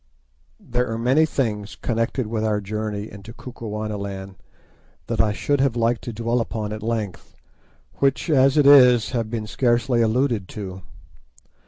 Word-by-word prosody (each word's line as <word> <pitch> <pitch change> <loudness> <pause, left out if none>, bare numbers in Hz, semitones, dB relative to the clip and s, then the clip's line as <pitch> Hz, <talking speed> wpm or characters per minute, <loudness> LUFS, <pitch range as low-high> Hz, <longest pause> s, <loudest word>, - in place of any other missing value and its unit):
There 125 +1 -2
are 115 - -2
many 130 +7 +3
things 110 -7 -2
connected 115 +2 -1
with 110 0 -2
our 105 -1 +1
journey 105 +1 -4
into 100 +3 -11
Kukuanaland 105 -5 -6 0.7
that - - +1
I 110 -1 +1
should 140 +6 0
have 135 -4 +1
liked 115 0 +1
to 120 - -4
dwell 115 +2 -1
upon 110 -2 -4
at 110 - -6
length, 110 -4 -4 0.6
which, 140 +4 +1
as 135 -2 +4
it 145 - +5
is, 125 -5 +7
have 115 -4 -2
been 115 -2 -3
scarcely 120 +2 +1
alluded 115 -3 +1
to. 95 -2 -7
115 Hz, 150 wpm, -22 LUFS, 105-125 Hz, 0.7 s, is